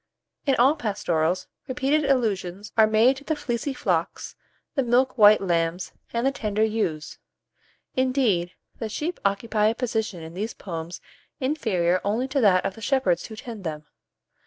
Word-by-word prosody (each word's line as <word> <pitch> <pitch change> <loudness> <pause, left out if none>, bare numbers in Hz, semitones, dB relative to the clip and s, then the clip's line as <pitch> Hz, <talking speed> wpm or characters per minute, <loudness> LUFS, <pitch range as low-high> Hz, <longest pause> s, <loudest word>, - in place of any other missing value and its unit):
In 270 - +4
all 265 +5 +4
pastorals, 185 - -1 0.2
repeated 275 +3 +1
allusions 205 -7 -1
are 220 -1 +6
made 225 +5 +4
to 280 - -11
the 315 +1 -1
"fleecy 260 -1 -3
flocks," 290 +2 -2 0.4
the 275 - +1
"milk 250 +1 +2
white 215 -2 +7
lambs," 170 -1 -1 0.2
and 235 +2 -1
"the 270 - +3
tender 215 -5 -1
ewes;" 210 -9 -2 0.8
indeed, 255 -10 +1 0.3
the 225 - -3
sheep 315 +10 -3
occupy 210 +2 +1
a 225 - +1
position 220 -8 -2
in 160 +1 -9
these 210 +5 -4
poems 170 -1 -6 0.4
inferior 205 - +1
only 225 +6 0
to 275 0 +1
that 190 -4 +4
of - - -1
the 225 - -13
shepherds 220 - +1
who 220 - -9
tend 220 -2 -8
them. 155 -3 -5
220 Hz, 160 wpm, -25 LUFS, 185-260 Hz, 0.8 s, white